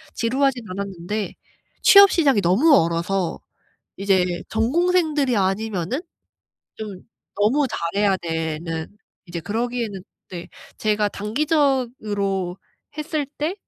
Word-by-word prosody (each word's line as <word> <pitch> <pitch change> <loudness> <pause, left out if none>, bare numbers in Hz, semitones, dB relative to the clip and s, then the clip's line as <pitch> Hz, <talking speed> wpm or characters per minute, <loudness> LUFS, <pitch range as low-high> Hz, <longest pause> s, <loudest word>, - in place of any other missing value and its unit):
지루하진 255 +1 +1
않았는데 195 +2 -4 0.5
취업 400 0 +9
시장이 275 - +3
너무 215 - +4
얼어서 170 0 0 0.6
이제 195 -2 +2 0.2
전공생들이 295 - +2
아니면은 195 - -1 0.8
좀 205 -4 -7 0.4
너무 250 +8 +3
잘해야 195 +3 0
되는, 160 0 -3 0.4
이제 170 -1 -5
그러기에는 225 0 -3 0.3
네. 175 -1 -7 0.3
제가 210 -1 +1
단기적으로 215 - -1 0.4
했을 305 -1 -2
때 310 +5 -1
210 Hz, 240 characters per minute, -22 LUFS, 185-270 Hz, 0.8 s, 취업